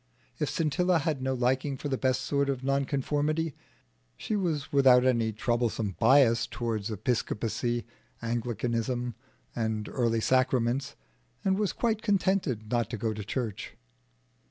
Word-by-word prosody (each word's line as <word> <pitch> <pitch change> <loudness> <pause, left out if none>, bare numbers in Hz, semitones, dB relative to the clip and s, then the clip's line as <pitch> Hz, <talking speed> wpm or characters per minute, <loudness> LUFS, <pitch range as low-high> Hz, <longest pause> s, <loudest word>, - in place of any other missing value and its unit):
If - - 0
Scintilla 175 +3 +1
had 150 -3 -1
no 130 0 0
liking 130 +3 0
for 145 - -5
the 135 - 0
best 130 -1 +1
sort 140 -1 0
of 135 -2 -2
nonconformity, 145 +3 0 0.6
she 215 - -2
was 160 -6 -2
without 130 -3 +6
any 115 -3 +2
troublesome 115 -3 -1
bias 115 -2 +5
towards 115 -3 -3
Episcopacy, 115 +2 -1 0.3
Anglicanism, 120 +1 -2 0.4
and 110 -2 -2
early 115 -3 +1
sacraments, 130 +2 +1 0.5
and 190 -1 +3
was 205 -1 0
quite 225 -2 0
contented 185 - 0
not 120 -3 +1
to 115 - -4
go 110 +1 -1
to 105 0 -6
church. 110 -1 -4
125 Hz, 130 wpm, -29 LUFS, 115-140 Hz, 0.6 s, without